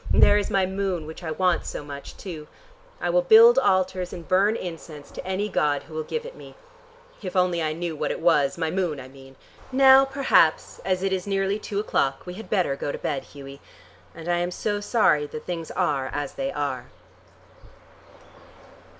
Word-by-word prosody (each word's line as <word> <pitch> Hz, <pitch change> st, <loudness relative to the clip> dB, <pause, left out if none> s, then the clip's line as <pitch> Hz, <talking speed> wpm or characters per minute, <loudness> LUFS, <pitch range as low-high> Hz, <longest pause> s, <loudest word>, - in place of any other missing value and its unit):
There 205 Hz, -, +5 dB
is 205 Hz, -, -3 dB
my 195 Hz, -1 st, +2 dB
moon 190 Hz, -3 st, -2 dB
which 160 Hz, +3 st, -9 dB
I 165 Hz, -, -5 dB
want 180 Hz, +2 st, +1 dB
so -, -, -6 dB
much, 140 Hz, -1 st, -9 dB
too. 160 Hz, -6 st, -8 dB, 0.5 s
I -, -, -1 dB
will -, -, +3 dB
build 470 Hz, +1 st, +7 dB
altars 185 Hz, -, +1 dB
and 170 Hz, -2 st, -9 dB
burn 200 Hz, +4 st, +3 dB
incense 165 Hz, -6 st, -8 dB
to -, -, -8 dB
any 190 Hz, +3 st, -2 dB
god 150 Hz, -7 st, 0 dB
who 155 Hz, -, -15 dB
will 155 Hz, -, -2 dB
give 465 Hz, -, -4 dB
it -, -, -9 dB
me. -, -, -13 dB, 0.7 s
If 185 Hz, -3 st, -6 dB
only 180 Hz, -2 st, +2 dB
I 155 Hz, -1 st, -1 dB
knew 170 Hz, 0 st, -4 dB
what -, -, -2 dB
it -, -, -3 dB
was. 155 Hz, -4 st, +2 dB
My 160 Hz, -1 st, -1 dB
moon, 175 Hz, -6 st, -1 dB
I 130 Hz, -, -9 dB
mean! 135 Hz, 0 st, -15 dB, 0.4 s
Now 265 Hz, 0 st, +7 dB
perhaps 270 Hz, -, +2 dB
as 185 Hz, +1 st, -1 dB
it 195 Hz, 0 st, 0 dB
is 185 Hz, 0 st, -3 dB
nearly 195 Hz, +1 st, 0 dB
two 205 Hz, -1 st, -4 dB
o'clock, 135 Hz, -9 st, -1 dB
we 180 Hz, -, -6 dB
had 220 Hz, +4 st, -10 dB
better 180 Hz, -9 st, +1 dB
go 145 Hz, -, -3 dB
to -, -, -5 dB
bed, 135 Hz, -, -3 dB
Hughie. 140 Hz, -1 st, -12 dB, 0.5 s
And 165 Hz, 0 st, -9 dB
I 175 Hz, 0 st, +1 dB
am 175 Hz, 0 st, -1 dB
so 205 Hz, +3 st, -2 dB
sorry 170 Hz, -10 st, +2 dB
that 155 Hz, -, -8 dB
things 165 Hz, -2 st, -5 dB
are 135 Hz, -3 st, -1 dB
as 145 Hz, -1 st, -4 dB
they 275 Hz, 0 st, -3 dB
are." 130 Hz, -4 st, -3 dB
175 Hz, 195 wpm, -24 LUFS, 150-200 Hz, 0.7 s, build